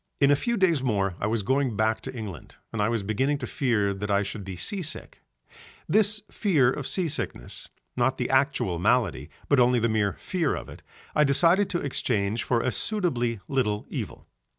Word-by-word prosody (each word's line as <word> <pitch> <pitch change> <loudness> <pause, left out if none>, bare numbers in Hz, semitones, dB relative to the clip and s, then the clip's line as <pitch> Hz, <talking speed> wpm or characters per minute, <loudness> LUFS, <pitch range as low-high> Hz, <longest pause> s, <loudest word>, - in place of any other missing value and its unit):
In 140 0 +5
a - - +6
few 235 - -1
days 170 -7 +3
more 100 -7 0
I 100 - -1
was 110 -1 0
going 130 +1 +1
back 110 +1 +1
to - - -7
England 100 -8 -8 0.2
and 115 - -1
I 105 - +2
was 115 -3 -1
beginning 130 +8 0
to 135 - -5
fear 115 -7 0
that 105 +1 -5
I 100 0 +2
should 100 +1 -6
be 95 -1 -6
sea 190 - -1
sick: 155 - -4 0.7
this 210 +3 +3
fear 150 - +3
of 135 -1 -4
sea 185 -3 0
sickness, 150 - -3 0.3
not 125 +2 +1
the 125 - -1
actual 130 -10 +1
malady 100 - +1 0.2
but 140 - +4
only 125 0 +4
the 115 0 +2
mere 110 -2 +1
fear 170 -6 -1
of - - -7
it, - - -11 0.3
I 150 - +4
decided 170 +8 +3
to 175 -3 -1
exchange 110 -6 -1
for 120 -2 +1
a 130 - 0
suitably 120 - 0
little 105 -6 0
evil. - - -6
125 Hz, 195 wpm, -26 LUFS, 105-145 Hz, 0.7 s, a